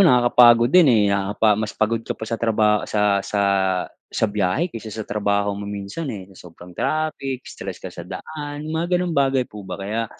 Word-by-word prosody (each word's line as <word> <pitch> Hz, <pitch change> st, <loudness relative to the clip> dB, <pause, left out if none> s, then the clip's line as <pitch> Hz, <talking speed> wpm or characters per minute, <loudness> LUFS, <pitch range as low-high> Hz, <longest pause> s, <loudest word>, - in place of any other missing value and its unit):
nakakapagod 120 Hz, -3 st, +6 dB
din, 180 Hz, -5 st, +7 dB
eh, 115 Hz, -4 st, +5 dB
nakaka 100 Hz, +2 st, +2 dB
mas 110 Hz, -1 st, -3 dB
pagod 110 Hz, +1 st, +1 dB
ka -, -, -5 dB
pa -, -, -6 dB
sa 115 Hz, +1 st, -3 dB
trabaho 105 Hz, -2 st, +2 dB
sa 105 Hz, -2 st, +2 dB
sa 100 Hz, +1 st, -2 dB, 0.7 s
sa -, -, -1 dB
biyahe 105 Hz, -, 0 dB
kaysa 115 Hz, -1 st, -7 dB
sa 110 Hz, -, -5 dB
trabaho 100 Hz, 0 st, 0 dB
mo 100 Hz, 0 st, -6 dB
minsan, 100 Hz, +10 st, -5 dB
eh, 105 Hz, -7 st, -6 dB
sa 90 Hz, -1 st, -13 dB
sobrang 85 Hz, +2 st, -14 dB
traffic, 140 Hz, -, -2 dB
stress 95 Hz, -2 st, -7 dB
ka 95 Hz, -, -6 dB
sa 90 Hz, -, -9 dB
daan, 145 Hz, +6 st, -7 dB
mga 170 Hz, +3 st, 0 dB
ganon'g 180 Hz, -1 st, -1 dB
bagay 135 Hz, -3 st, +2 dB
po 105 Hz, -4 st, -11 dB
ba. -, -, -5 dB
Kaya, 110 Hz, +4 st, -3 dB
110 Hz, 195 wpm, -22 LUFS, 100-135 Hz, 0.7 s, din